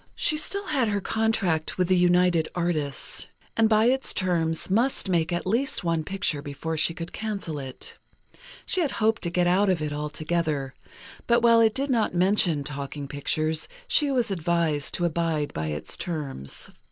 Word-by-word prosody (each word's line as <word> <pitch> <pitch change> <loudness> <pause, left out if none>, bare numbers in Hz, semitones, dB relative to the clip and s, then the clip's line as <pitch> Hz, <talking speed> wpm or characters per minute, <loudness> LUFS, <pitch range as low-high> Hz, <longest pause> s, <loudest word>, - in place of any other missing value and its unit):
She 310 - +2
still 400 +6 0
had 275 -9 +1
her 205 -1 0
contract 195 -7 0
with 180 -1 +2
the 185 - +3
United 175 -2 +3
Artists, 160 -5 -1 0.3
and 225 -1 +4
by 215 0 +4
its 265 +2 +3
terms 165 -4 0
must 230 +4 +1
make 170 -3 +1
at 175 0 -2
least 255 +8 0
one 165 -2 0
picture 190 -5 -1
before 145 +3 -4
she 160 +1 +1
could 165 0 -7
cancel 200 -8 -4
it. 130 -2 -6 0.7
She 370 - 0
had 305 - 0
hoped 220 +1 +1
to 170 - -1
get 175 +1 +1
out 190 +3 +3
of 185 -3 +2
it 150 -1 -3
altogether; 150 -1 -2 0.5
but 235 0 +3
while 230 -1 +6
it 220 -1 +3
did 275 +1 -1
not 225 -7 +1
mention 180 -5 +3
talking 140 0 -5
pictures, 155 +3 -1 0.2
she 315 -12 +2
was 245 -6 +1
advised 165 -4 0
to 175 - 0
abide 165 -3 -1
by 80 0 -3
the 75 0 -3
terms. 145 - -4
175 Hz, 175 wpm, -26 LUFS, 155-220 Hz, 0.7 s, while